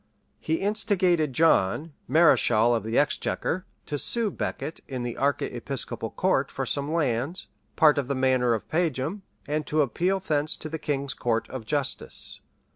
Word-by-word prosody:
He 160 - -1
instigated 185 -5 +1
John, 155 - +2
mareschal 120 -7 +4
of 115 - +1
the 110 +2 -2
exchequer, 165 +4 0 0.2
to 145 - -3
sue 230 - +1
Becket 160 - -4
in 130 -3 -4
the 120 -1 -4
archiepiscopal 135 -2 -2
court - - +1
for - - -3
some 140 +1 -1
lands, 145 +1 -1 0.3
part 150 -3 +5
of 135 - -3
the 140 - -1
manor 130 -2 +2
of 110 - -6
Pageham; 160 +2 -1 0.2
and 150 +1 -2
to 155 0 +3
appeal 180 - 0
thence 155 -4 -1
to 155 - -7
the 160 +1 -4
king's 140 -2 -1
court 115 -3 -1
for 130 - -6
justice. 140 +4 -3
145 Hz, 155 wpm, -26 LUFS, 130-165 Hz, 0.3 s, part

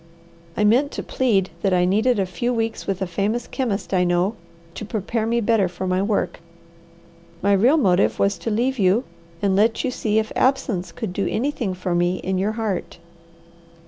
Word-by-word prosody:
I 210 - +2
meant 245 +7 +4
to - - -4
plead 205 -8 +1
that 195 -2 +2
I 180 0 +3
needed 220 +6 +2
a 195 - +1
few 185 +7 -2
weeks 225 -2 -2
with 195 -1 -1
a - - 0
famous 205 +7 -1
chemist 230 -7 -3
I 180 -1 +3
know 175 +4 +1 0.4
to - - -7
prepare 220 +1 -2
me 235 +1 +1
better 220 -3 +2
for 180 +1 -6
my 185 0 +1
work. 205 +1 -1 1.0
My 200 +1 +4
real 240 +11 +4
motive 190 - +2
was 200 0 +1
to - - -3
leave 245 +4 0
you, 195 +5 +3 0.4
and 195 -1 +2
let 220 +3 +2
you 260 - 0
see 215 -3 -1
if 220 0 0
absence 210 -9 0
could 225 -7 -5
do 200 - -1
anything 235 -5 -1
for 180 -1 -3
me 175 +1 +2
in 185 0 -2
your 205 +3 0
heart. 215 -7 -3
205 Hz, 190 wpm, -22 LUFS, 185-230 Hz, 1.0 s, meant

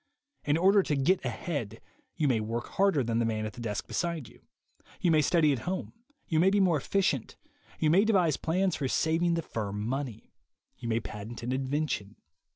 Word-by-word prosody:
In 145 +1 +2
order 195 +4 +5
to 150 - -1
"get 165 +8 +2
ahead," 120 - -4 0.4
you 155 -3 +1
may 125 -5 +2
work 115 +2 -3
harder 195 -8 +2
than 115 0 0
the - - +2
man 110 -1 -1
at 110 - -5
the 120 - -9
desk 105 -3 -3
beside 170 -7 -2
you; - - -18 0.6
you 175 - +2
may 155 -1 +5
study 155 0 +3
at 130 - -2
home, 185 - -4 0.3
you 160 -3 +1
may 185 +3 +5
be 205 +1 +2
more 180 -5 +4
efficient, 150 - -1 0.4
you 155 - +2
may 190 +5 +5
devise 185 -9 +3
plans 180 +2 0
for 140 - -2
saving 165 +5 +1
the 165 - -2
firm 105 -5 -4
money; 130 -4 -4 0.4
you 115 - -7
may 115 0 +1
patent 110 +3 -8
an 120 - -2
invention. 130 -6 -2
145 Hz, 195 wpm, -29 LUFS, 115-170 Hz, 0.6 s, order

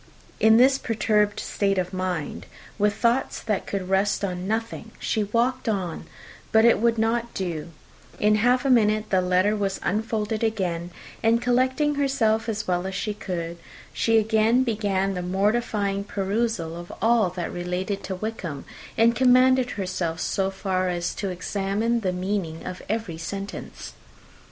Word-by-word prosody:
In 220 0 +6
this 265 +3 +5
perturbed 210 -2 +1
state 195 -1 0
of 185 0 -1
mind, 185 -4 -3 0.3
with 205 0 +2
thoughts 240 +2 +1
that 215 -3 -2
could 195 -2 -3
rest 195 +2 +1
on 180 -1 -4
nothing, 225 +1 -3
she 215 -2 -1
walked 235 +4 0
on; 185 -6 -3 0.4
but 220 +1 +5
it 235 - +5
would 230 +1 +2
not 230 +1 0
do: 170 -5 -3 0.5
in 210 0 +4
half 245 +4 +2
a 270 - +3
minute 215 -2 +3
the 190 -1 +4
letter 185 +3 +2
was 200 -2 -2
unfolded 215 0 -1
again; 180 -6 -1 0.3
and 225 +1 +3
collecting 260 +4 +2
herself 240 -6 +1
as 215 -1 -3
well 180 0 0
as 190 - -5
she 210 +1 -2
could, 170 -4 -5 0.3
she 225 -1 +2
again 220 +3 +3
began 200 -5 0
the 180 - -3
mortifying 200 +1 0
perusal 200 -4 -2
of 175 0 -8
all 225 -4 +3
that 175 -1 -5
related 180 +3 -3
to 190 - -3
Wickham, 185 -8 -5 0.3
and 230 +1 +4
commanded 255 0 +4
herself 180 -5 -3
so 195 +2 0
far 190 -1 -1
as 175 -1 -2
to 195 - -3
examine 200 +5 -1
the 190 -5 -1
meaning 180 -3 -3
of 185 0 -6
every 210 -7 -3
sentence. 195 +4 -6
205 Hz, 155 wpm, -25 LUFS, 185-225 Hz, 0.5 s, In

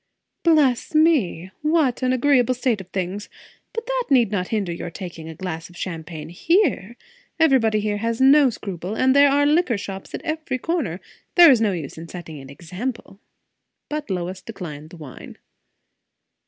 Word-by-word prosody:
"Bless 300 -5 +2
me! 250 - +2
what 305 -5 +1
an 255 0 +1
agreeable 255 -1 +3
state 245 -4 0
of 185 - -13
things! 190 +2 -4 0.4
But 460 -1 -5
that - - -1
need 245 -7 +4
not 185 -3 -1
hinder 205 -5 -2
your 170 0 -5
taking 165 -2 -8
a 160 - -8
glass 165 -1 -6
of 175 - -15
champagne 160 -3 -6
here? 245 - +1 0.4
Everybody 255 -9 +4
here 205 0 -1
has 230 +2 -2
no 275 +1 +6
scruple, 195 -3 -6
and 260 +2 +3
there 285 0 +7
are 285 +1 +3
liquor 300 -5 +2
shops 195 -1 -7
at - - -7
every 315 -4 -3
corner; 255 - -2 0.3
there 345 -4 +9
is 240 -4 +3
no 215 -2 +2
use 160 -4 -6
in 165 - -9
setting 165 -4 -9
an 135 0 -12
example." 190 - -6 0.7
But 300 -3 -4
Lois 185 0 -3
declined 155 -8 -8
the 175 - -12
wine. 150 -5 -11
220 Hz, 170 wpm, -22 LUFS, 175-280 Hz, 0.7 s, there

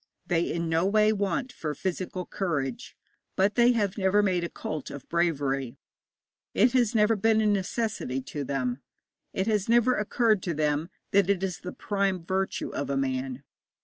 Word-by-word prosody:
They 170 -1 0
in 170 0 -2
no 160 +1 +2
way 215 +1 +4
want 215 +6 -1
for 150 -8 -4
physical 185 0 -3
courage, 145 - -3 0.4
but 195 +2 +3
they 240 0 +5
have 205 -3 0
never 195 +2 +3
made 180 -3 +1
a 170 - -2
cult 155 -3 -5
of 140 -2 -9
bravery; 140 -7 0 0.8
it 235 +4 +5
has 245 -3 +2
never 215 +1 +4
been 220 +2 +3
a 220 - +2
necessity 205 - -1
to 145 +2 -5
them; 130 -1 -2 0.5
it 190 - -1
has 210 -1 0
never 240 +2 +4
occurred 215 -1 +2
to 170 -3 -2
them 150 +2 0 0.2
that 200 -1 +4
it 195 -2 +1
is 185 -3 -2
the 180 - -6
prime 195 -4 -1
virtue 190 +1 -1
of 140 - -4
a 140 - 0
man. 130 0 -2
185 Hz, 175 wpm, -27 LUFS, 150-210 Hz, 0.8 s, they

